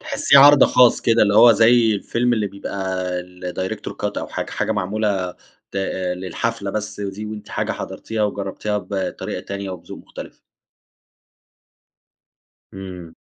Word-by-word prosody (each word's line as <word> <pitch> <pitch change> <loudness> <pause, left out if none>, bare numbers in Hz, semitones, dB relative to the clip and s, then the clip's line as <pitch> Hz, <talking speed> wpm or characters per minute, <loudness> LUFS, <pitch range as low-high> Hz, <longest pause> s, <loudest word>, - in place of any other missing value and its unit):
تحسيه 140 - +3
عرض 145 +1 +8
خاص 125 -2 +4
كده 115 -1 +3
اللي 100 -1 +2
هو 115 +1 +8
زي 115 0 +4
الفيلم 120 +4 0
اللي 110 -3 0
بيبقى 95 -1 -4 0.2
الdirector 90 +1 -6
cut - - -4
أو - - -5
حاجة، - - -5
حاجة - - -1
معمولة 95 -2 -2 0.3
ت - - -8 0.4
للحفلة 100 +3 -3
بس 105 0 -5
دي، 100 +1 -5
وأنتِ 105 -1 -8
حاجة - - -2
حضرتيها 110 -1 -5
وجربتيها 105 +1 -2
بطريقة 100 -2 -4
تانية 100 -1 -6
وبذوق 90 -2 -9
مختلف. - - -11 2.3
إمم. 90 -3 -9
100 Hz, 130 wpm, -21 LUFS, 95-110 Hz, 2.3 s, عرض